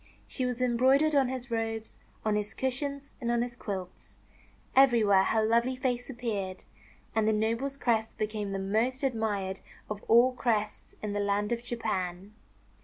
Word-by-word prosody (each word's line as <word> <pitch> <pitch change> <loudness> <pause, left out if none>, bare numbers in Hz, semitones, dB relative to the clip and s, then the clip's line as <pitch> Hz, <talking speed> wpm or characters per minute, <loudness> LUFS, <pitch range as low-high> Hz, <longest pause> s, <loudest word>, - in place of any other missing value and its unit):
She 255 -2 -2
was 250 -1 -3
embroidered 260 +5 +4
on 275 -3 +4
his 255 -1 -5
robes, 225 -1 -3 0.3
on 215 -1 +2
his 210 -1 -2
cushions, 280 +2 -3
and 235 - -1
on 235 0 +2
his 240 0 -6
quilts. 190 -6 -6 0.6
Everywhere 230 -8 +6
her 220 -1 +2
lovely 235 +3 +2
face 250 -1 -2
appeared; 210 -7 -4 0.5
and 220 -1 +2
the - - +4
noble's 230 +6 0
crest 225 -4 0
became 210 -1 -2
the 195 - -2
most 220 +8 0
admired 210 -7 -1 0.3
of 210 0 -5
all 240 +3 +6
crests 215 -4 -2
in 210 -1 -2
the 205 - -1
land 205 +1 0
of 235 0 0
Japan. 205 -5 -3
230 Hz, 160 wpm, -29 LUFS, 210-250 Hz, 0.6 s, Everywhere